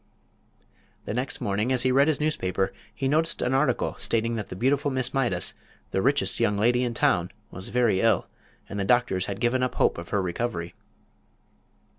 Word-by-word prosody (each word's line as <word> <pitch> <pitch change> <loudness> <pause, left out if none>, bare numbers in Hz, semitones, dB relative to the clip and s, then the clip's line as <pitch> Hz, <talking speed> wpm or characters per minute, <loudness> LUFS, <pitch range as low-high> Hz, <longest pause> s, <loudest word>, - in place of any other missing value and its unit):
The - - -3
next 125 +3 -3
morning, 105 +5 0
as 130 -1 +2
he 130 - +2
read 140 +3 +4
his 155 -3 +1
newspaper, 95 -11 -1 0.2
he 135 - -3
noticed 160 +4 +2
an 125 - 0
article 135 -2 +1
stating 115 +1 0
that 110 -3 -5
the - - -6
beautiful 135 +7 +1
Miss 130 -2 0
Mydas, 120 -10 0 0.4
the 95 - 0
richest 120 -7 +1
young 105 -3 +2
lady 120 +4 +3
in 120 -2 -2
town, 90 -4 +2 0.2
was 95 +1 -6
very 120 -6 +2
ill, 115 -1 +3 0.4
and 100 - -5
the - - 0
doctors 115 -4 +2
had 100 -1 -4
given 120 +2 +1
up 125 - -1
hope - - +2
of 85 - -9
her 100 - +1
recovery. 90 -2 -3
120 Hz, 185 wpm, -26 LUFS, 95-130 Hz, 0.4 s, read